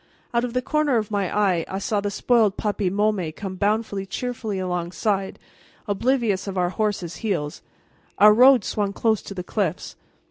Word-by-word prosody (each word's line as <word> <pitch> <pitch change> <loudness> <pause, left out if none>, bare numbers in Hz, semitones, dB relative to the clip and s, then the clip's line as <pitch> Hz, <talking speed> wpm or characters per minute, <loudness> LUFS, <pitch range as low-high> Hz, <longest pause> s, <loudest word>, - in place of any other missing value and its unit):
Out 235 0 +2
of 245 -2 -3
the 250 0 0
corner 305 -4 +1
of 215 -1 -2
my 200 -3 -1
eye 190 -5 +2
I 190 - -4
saw 205 +1 -1
the 205 - -2
spoiled 215 0 +2
puppy 205 -3 -1
Môme 195 -5 0
come 195 -2 -5
bounding 200 0 -1
cheerfully 225 -2 -4
alongside, 185 +2 -2 0.5
oblivious 210 -2 0
of 195 -1 -4
our 180 -1 +1
horses' 200 -5 -2
heels. 175 -8 -3 0.6
Our 210 +1 +8
road 250 0 +6
swung 200 -1 -2
close 220 -1 +1
to 200 - -9
the 180 - -4
cliffs. 185 -3 -3
205 Hz, 170 wpm, -23 LUFS, 190-220 Hz, 0.6 s, Our